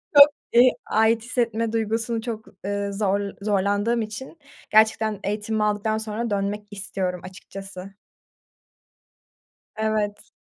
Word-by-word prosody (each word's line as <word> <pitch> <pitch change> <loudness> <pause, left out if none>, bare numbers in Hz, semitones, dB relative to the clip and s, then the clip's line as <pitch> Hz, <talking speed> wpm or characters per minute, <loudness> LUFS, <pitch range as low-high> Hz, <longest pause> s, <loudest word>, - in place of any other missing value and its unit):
Çok 285 0 +11 0.3
ııı, 245 +2 +8 0.2
ait 220 +1 +3
hissetme 230 -2 0
duygusunu 225 +1 -1
çok, 225 -2 -5 0.2
ııı, 200 0 -2
zor 200 -1 +1 0.2
zorlandığım 205 +3 +1
için 220 +9 -7 0.3
gerçekten 220 -1 +3
eğitimimi 210 +1 -1
aldıktan 210 +1 +1
sonra 220 +2 -3
dönmek 205 +1 -2
istiyorum 190 -3 -3
açıkçası. 195 +1 -9 1.8
Evet. 215 -1 -1
215 Hz, 105 wpm, -24 LUFS, 200-225 Hz, 1.8 s, Çok